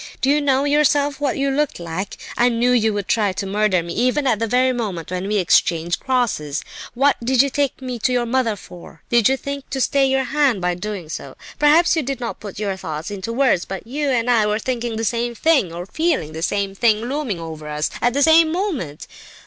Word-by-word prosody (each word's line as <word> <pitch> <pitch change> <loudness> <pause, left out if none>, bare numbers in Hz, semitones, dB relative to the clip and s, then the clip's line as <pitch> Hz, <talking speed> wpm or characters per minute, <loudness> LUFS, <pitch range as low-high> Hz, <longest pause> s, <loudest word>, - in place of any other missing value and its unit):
Do 270 - +2
you 295 +1 +3
know 275 -1 +2
yourself 290 -1 +2
what 285 -2 0
you 275 0 0
looked 295 -4 -1
like? 170 +3 -5 0.2
I 240 +1 +3
knew 240 +1 +1
you 225 -3 +3
would 205 -1 -3
try 210 -4 +1
to 195 - -4
murder 195 -2 +1
me 170 - -6
even 255 +5 +1
at 235 -5 +2
the 230 - 0
very 255 +3 +2
moment 195 -9 -4
when 185 +1 -3
we 210 +1 0
exchanged 170 -2 +2
crosses. 220 - -1 0.3
What 275 +2 +3
did 260 +2 +4
you 280 - -2
take 280 -1 -1
me 250 -2 -4
to 255 - +1
your 245 -1 +1
mother 235 -2 0
for? 175 -4 -13
Did 235 -2 +4
you 265 - +1
think 280 0 -6
to 270 - -3
stay 270 +1 +2
your 265 0 +1
hand 275 -4 +1
by 180 0 0
doing 190 -1 -5
so? 155 - -7 0.2
Perhaps 315 +4 +5
you 320 - +1
did 270 -2 -4
not 235 -2 -5
put 205 -3 -9
your 200 -2 -2
thoughts 160 0 -5
into 200 +2 -5
words, 235 -7 +2
but 195 +1 -7
you 285 +4 -2
and 245 -2 +1
I 230 -4 +3
were 210 0 +1
thinking 240 0 -3
the 225 +1 -2
same 235 +1 -1
thing, 290 - +2
or 175 +1 -6
feeling 300 - -1
the 160 +1 -7
same 200 +2 -1
thing 215 +1 +2
looming 250 - -3
over 160 -2 -7
us, 150 +1 -2
at 245 0 +2
the 285 - +3
same 320 +1 +6
moment. 320 - -3
235 Hz, 230 wpm, -20 LUFS, 195-275 Hz, 0.3 s, same